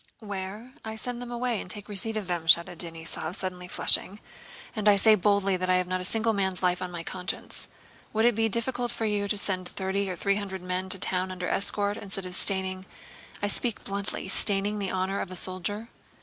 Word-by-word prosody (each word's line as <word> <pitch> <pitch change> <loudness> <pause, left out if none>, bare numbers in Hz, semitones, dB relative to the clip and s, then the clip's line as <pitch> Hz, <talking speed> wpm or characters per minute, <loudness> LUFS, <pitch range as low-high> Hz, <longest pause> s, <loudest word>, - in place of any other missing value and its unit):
"Where? 205 +3 -6
I 220 0 -5
send 245 +2 -4
them 245 - -6
away 240 -2 -1
and - - -9
take 205 +1 -5
a - - -9
weceipt 220 +3 0
for 215 - 0
them," 175 -4 -3
shouted 170 +1 +5
Denísov, 165 0 -2
suddenly 180 -2 -4
flushing. 195 +2 +2 0.6
"And 215 -1 +3
I 205 - +7
say 215 +2 +6
boldly 200 -1 +3
that 185 0 -2
I 185 - +5
have 180 0 +2
not 185 0 -2
a - - -4
single 225 +3 +1
man's 190 -2 0
life 180 0 +2
on 180 - -2
my 175 -1 -5
conscience. 180 +2 -3 0.4
Would 220 +1 +2
it 240 - +6
be 225 +1 +2
difficult 240 +2 -1
for 230 -2 -2
you 205 -1 +1
to 210 - 0
send 185 -2 +1
thirty 195 +1 -1
or 180 - -2
thwee 200 +2 +1
hundwed 190 -2 -5
men 185 +1 -2
to 195 - +5
town 185 0 +1
under 180 -1 -4
escort, 205 +1 +1
instead 195 -1 -6
of 180 - -6
staining—I 190 +1 -1
speak 230 +2 +1
bluntly—staining 200 +1 0
the 195 -2 -1
honor 190 +1 -1
of - - -4
a 185 - -6
soldier?" 190 +5 -2
195 Hz, 210 wpm, -28 LUFS, 185-210 Hz, 0.6 s, I